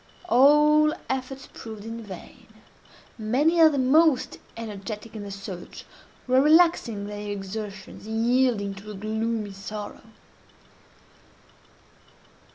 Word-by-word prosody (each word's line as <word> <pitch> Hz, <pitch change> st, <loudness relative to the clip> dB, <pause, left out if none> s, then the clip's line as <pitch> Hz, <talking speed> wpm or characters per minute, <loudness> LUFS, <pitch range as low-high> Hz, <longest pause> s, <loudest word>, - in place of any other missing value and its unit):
All 300 Hz, +4 st, +5 dB, 0.2 s
efforts 265 Hz, 0 st, -4 dB
proved 220 Hz, -2 st, -9 dB
in 230 Hz, +1 st, -6 dB
vain. 190 Hz, -5 st, -11 dB, 0.7 s
Many 280 Hz, +10 st, +2 dB
of 320 Hz, -1 st, +8 dB
the 285 Hz, -, -2 dB
most 275 Hz, +1 st, +3 dB, 0.2 s
energetic 215 Hz, 0 st, -7 dB
in 215 Hz, -, -5 dB
the 205 Hz, -, -7 dB
search 195 Hz, -2 st, -8 dB, 0.4 s
were 255 Hz, +1 st, +4 dB
relaxing 300 Hz, -9 st, +4 dB
their 205 Hz, 0 st, -6 dB
exertions, 200 Hz, 0 st, -7 dB
and 220 Hz, +1 st, -1 dB
yielding 240 Hz, -5 st, +2 dB
to 195 Hz, +2 st, -11 dB
a 210 Hz, -, -7 dB
gloomy 220 Hz, +1 st, -2 dB
sorrow. 205 Hz, +2 st, -7 dB
220 Hz, 110 wpm, -25 LUFS, 205-265 Hz, 0.7 s, of